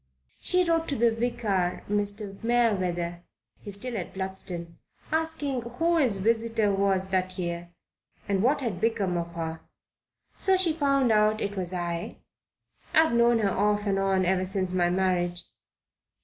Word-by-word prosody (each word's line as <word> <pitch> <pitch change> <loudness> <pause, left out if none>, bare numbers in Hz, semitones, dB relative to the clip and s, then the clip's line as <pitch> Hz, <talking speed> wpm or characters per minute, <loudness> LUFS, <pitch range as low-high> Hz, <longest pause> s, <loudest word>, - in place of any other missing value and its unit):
"She 365 0 +3
wrote 330 -1 +1
to 280 - -1
the 235 -1 +3
vicar, 225 -6 -1
Mr. 205 0 -1
Merewether 185 -8 +1 0.4
he - - -10
is 200 - +2
still 245 +4 -4
at 185 -3 -5
Bludston 185 -3 -5 0.3
asking 315 -5 0
who 325 +9 0
his 255 -10 +2
visitor 225 +1 +1
was 195 -1 +1
that 185 -1 -1
year 170 -1 -4 0.6
and 195 -2 +1
what 270 +6 +2
had 210 -8 -3
become 205 -5 0
of 170 0 -4
her. 160 -1 -4 0.8
So 380 -1 +2
she 355 -4 +2
found 275 -5 +2
out 215 0 +3
it 205 -1 -3
was 185 -2 -2
I. 175 -2 -3 0.8
I've 320 -4 +5
known 235 0 +4
her 200 -2 +2
off 205 +2 +1
and 195 -1 +1
on 190 -1 +2
ever 185 +1 +2
since 190 -1 -1
my 175 -1 +2
marriage." 175 -1 0
200 Hz, 155 wpm, -27 LUFS, 185-235 Hz, 0.8 s, I've